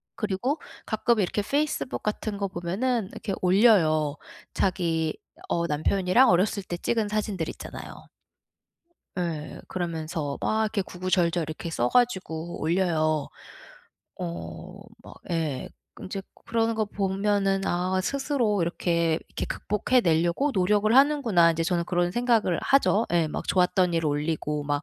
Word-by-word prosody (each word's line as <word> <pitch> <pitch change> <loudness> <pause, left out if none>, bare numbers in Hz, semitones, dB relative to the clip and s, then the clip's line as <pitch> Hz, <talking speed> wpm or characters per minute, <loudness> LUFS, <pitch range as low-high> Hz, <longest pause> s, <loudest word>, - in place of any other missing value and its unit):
그리고 215 +8 -1 0.3
가끔 235 -2 +1
이렇게 200 +2 0
페이스북 285 +4 -1
같은 210 0 -2
거 200 0 -1
보면은 195 +6 -1
이렇게 200 - -4
올려요. 180 -7 +4 0.4
자기 165 -4 0 0.3
어 170 0 0
남편이랑 185 - +3
어렸을 195 +3 +2
때 175 -1 -5
찍은 220 +3 0
사진들 205 -5 -2
있잖아요. - - -9 1.1
예. 165 -4 -4
그러면서 160 -4 -3
막 220 0 +1
이렇게 210 -1 0
구구절절 180 -2 0
이렇게 160 +1 -5
써 120 -7 0
가지고 180 -9 0
올려요. 155 -3 +1 0.9
어. 85 -1 -6 0.3
막 - - -12 0.2
예. 160 -6 -2 0.3
인제 195 +1 -5 0.2
그러는 230 0 +1
거 220 -1 0
보면은 195 0 0
'아 185 +2 0
스스로 250 - 0
이렇게 170 -1 0
이렇게 - - -4
극복해 210 +5 +1
내려고 170 - +2
노력을 210 +2 +2
하는구나.' 260 - +5
이제 165 0 -1
저는 170 0 0
그런 175 0 0
생각을 230 -5 +2
하죠. 250 -5 +3
예 170 -2 +3
막 - - -5
좋았던 180 -1 +2
일 165 -1 +1
올리고 150 0 -1
막 145 0 -1
185 Hz, 295 characters per minute, -26 LUFS, 165-210 Hz, 1.1 s, 하는구나